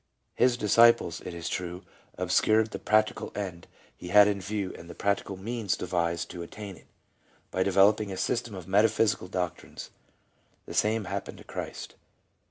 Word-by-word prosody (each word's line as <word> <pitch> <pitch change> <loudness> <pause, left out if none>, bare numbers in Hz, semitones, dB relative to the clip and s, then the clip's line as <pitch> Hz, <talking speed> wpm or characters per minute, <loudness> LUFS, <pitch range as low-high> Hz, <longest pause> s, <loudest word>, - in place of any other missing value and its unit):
His 125 -1 +3
disciples, 115 -5 +4
it 90 - -6
is 85 -1 -5
true, 90 0 -4 0.3
obscured 110 0 +2
the - - -5
practical 110 0 +1
end 95 -4 -5 0.3
he - - -10
had 105 +3 +7
in 100 -1 -1
view 100 0 -3
and 85 - -12
the - - -9
practical 100 -1 -1
means 110 -1 -2
devised 85 -1 -1
to 90 -1 -7
attain 100 +3 -8
it, - - -19 0.6
by 95 - -1
developing 100 +2 +4
a 95 - -5
system 115 -1 -2
of 90 -2 -9
metaphysical 105 0 +2
doctrines; 90 -2 -5 0.7
the - - -8
same 110 +1 +1
happened 100 +1 -5
to - - -13
Christ. - - -7
100 Hz, 160 wpm, -28 LUFS, 90-110 Hz, 0.7 s, had